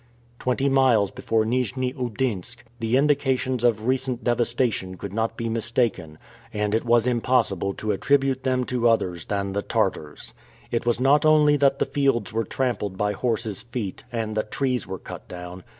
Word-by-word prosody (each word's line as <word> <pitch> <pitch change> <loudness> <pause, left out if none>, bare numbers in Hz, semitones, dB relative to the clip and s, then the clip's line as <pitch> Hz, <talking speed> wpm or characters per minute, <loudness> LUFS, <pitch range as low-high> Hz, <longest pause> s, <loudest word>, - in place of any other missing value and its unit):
Twenty 125 +2 0
miles 130 -7 +3
before 110 -1 0
Nijni 125 +2 -1
Oudinsk, 120 -3 -3 0.2
the 115 +2 +1
indications 135 -3 +1
of 110 -3 +2
recent 130 -1 -1
devastation 120 -6 0
could 100 +1 -7
not 115 +1 -1
be 115 - -3
mistaken, 115 -8 -1 0.3
and 105 -1 -1
it 110 - +1
was 120 -1 +3
impossible 120 -6 +1
to 110 - -2
attribute 135 +4 +1
them 130 -1 +1
to 120 -1 +1
others 90 -7 0
than 100 -1 -2
the 100 - -1
Tartars. 75 -6 -2 0.4
It 120 0 -1
was 120 - +2
not 140 +3 +4
only 150 -1 +5
that 140 -1 +3
the - - +1
fields 135 -7 0
were 115 0 0
trampled 105 -7 -2
by 105 +1 +1
horse's 110 -1 -2
feet, 115 -5 -5
and 110 -2 -3
that 110 0 -2
trees 130 -3 -1
were 95 - -4
cut - - -10
down. 90 +1 -8
120 Hz, 165 wpm, -24 LUFS, 105-130 Hz, 0.4 s, only